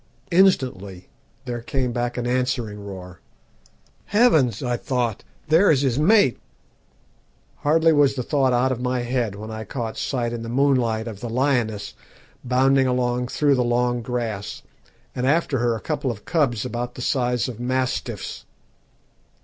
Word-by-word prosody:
Instantly 125 - +1 0.4
there 120 -2 -4
came 125 +1 -2
back 120 0 -2
an 120 - -2
answering 120 -4 -1
roar. 90 -3 -9 0.9
"'Heavens!' 160 - +3
I 125 -1 0
thought, 120 -3 -2 0.2
'there 165 +6 +5
is 140 -4 +4
his 135 -1 +1
mate.' 185 - +4 1.2
"Hardly 160 +2 +3
was 145 -2 +4
the 125 - -2
thought 135 0 +1
out 125 +2 +2
of 125 -1 -3
my 125 0 -1
head 120 -4 -1
when 110 +2 -8
I 110 0 -5
caught 115 +1 -5
sight 120 -3 -2
in 120 - -4
the 115 - -6
moonlight 120 -4 +1
of 105 -4 -7
the 120 - -5
lioness 115 -5 0 0.5
bounding 130 +1 +3
along 125 -1 0
through 145 +3 +2
the 125 -2 +2
long 120 0 +1
grass, 115 -4 -4 0.5
and 125 +1 -1
after 145 -2 +1
her 120 -1 +1
a - - -5
couple 145 +1 -2
of 105 -4 -6
cubs 130 -9 0
about 120 0 -4
the 125 - -6
size 125 -6 0
of 120 -3 -7
mastiffs. 130 +1 -3
125 Hz, 155 wpm, -23 LUFS, 115-135 Hz, 1.2 s, there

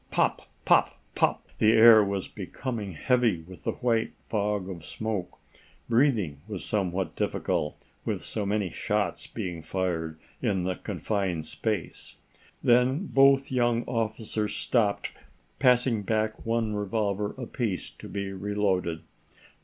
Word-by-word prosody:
Pop - - +1 0.2
pop - - +4
pop! - - +1
The 110 +1 +5
air 110 -1 +9
was 100 -1 -2
becoming 115 -7 -5
heavy 115 - +2
with 90 +2 -13
the - - 0
white 115 -3 0 0.2
fog 105 -3 0
of 90 -4 -7
smoke. 100 +2 -4 0.5
Breathing 115 - +2
was 105 -4 -5
somewhat 95 -4 -1
difficult, 75 - -2 0.2
with - - -2
so 105 - -2
many 100 -2 0
shots - - -1
being 85 -3 -5
fired 80 -3 -2 0.2
in 100 -7 +1
the 95 +1 0
confined 95 -6 -2
space. 105 +1 -4 0.5
Then 125 +8 +4
both 135 0 +5
young 120 -2 +2
officers 110 -2 -2
stopped, 105 -5 +1 0.5
passing 125 -3 +4
back 110 +2 -1
one 115 -2 +1
revolver 105 0 -1
apiece 120 -6 -3
to - - -11
be 100 -1 -4
reloaded. 95 -4 -1
105 Hz, 125 wpm, -28 LUFS, 95-115 Hz, 0.5 s, air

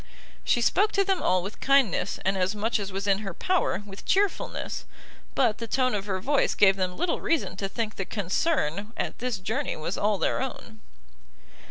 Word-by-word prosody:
She 240 - +2
spoke 410 - +3
to 395 - +3
them 385 -2 0
all 185 -1 +2
with 200 +3 -7
kindness, 265 -9 +2
and 195 +1 +2
as 190 +2 0
much 220 +2 0
as 200 -1 -4
was 195 +1 -3
in 195 -1 +3
her 195 -5 -5
power 365 - 0
with 195 -1 -10
chearfulness: 395 0 0 0.5
but 235 -6 +2
the 230 - -4
tone 255 +2 +1
of 205 -1 -2
her 190 -2 -1
voice 280 +8 +1
gave 195 -2 +6
them 185 -2 -2
little 355 - 0
reason 330 - 0
to 195 -1 -2
think 220 +1 -3
the 195 - -2
concern 205 - -1
at - - -3
this 250 -3 -1
journey 225 +9 -2
was 155 +4 -4
all 210 0 +2
their - - 0
own. 250 -4 -6
210 Hz, 195 wpm, -27 LUFS, 195-265 Hz, 0.5 s, gave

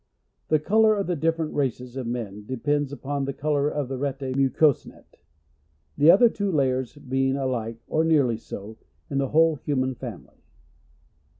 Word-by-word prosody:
The 155 - +3
colour 215 +7 +3
of 200 -1 -1
the 175 - -1
different 165 0 -1
races 125 -3 -2
of 130 -3 -4
men 105 -4 -5
de 130 - -4
pends 145 +2 0
upon 140 0 -3
the 140 - -3
colour 145 -1 0
of 145 -3 -3
this 130 0 -5
rete 135 -1 -3
mucosum, - - -2
(mucous 140 +1 +3
net - - -17 0.4
;) 75 - -19
ihe 150 - +7
other 210 +7 +8
two 205 -3 -2
layers 130 -4 0
being 135 -1 -1
alike 120 -4 -2
or 160 - +1
nearly 145 -8 +3
so, 110 0 -9 0.3
in 140 - 0
the 135 -1 0
whole 160 0 +4
human 130 -2 -1
family. - - -10
135 Hz, 180 wpm, -25 LUFS, 125-155 Hz, 0.4 s, other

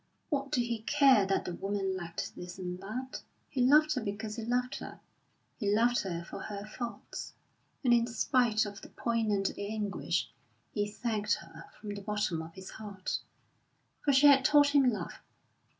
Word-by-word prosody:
What 280 -2 -1
did 255 - +2
he 235 -2 -2
care 260 -4 +5
that 195 - +1
the 180 - -3
woman 195 0 -1
lacked 170 -2 -5
this 180 +1 -8
and 180 -1 -4
that? 240 +7 -5 0.3
He 265 - -1
loved 300 +4 +6
her 255 - -1
because 210 0 -4
he 225 - -5
loved 250 +2 0
her; - - -8 0.6
he 205 -4 +1
loved 240 +2 +4
her 170 -3 -3
for - - -8
her 205 -1 -6
faults. 235 +2 -6 0.5
And 245 -2 +5
in 235 0 +4
spite 235 -2 +2
of 205 -1 -7
the - - -11
poignant 220 -4 0
anguish, 205 0 -2 0.4
he 205 -1 0
thanked 210 -1 0
her 165 -1 -12
from 210 -1 -5
the 200 - -6
bottom 205 -5 -1
of 160 +1 -10
his 190 0 -9
heart, 200 -3 -4 0.8
for 290 - +4
she 275 +2 +6
had 275 -2 +8
taught 290 0 +6
him 280 -3 +5
love. 215 - -5
215 Hz, 175 wpm, -31 LUFS, 195-250 Hz, 0.8 s, had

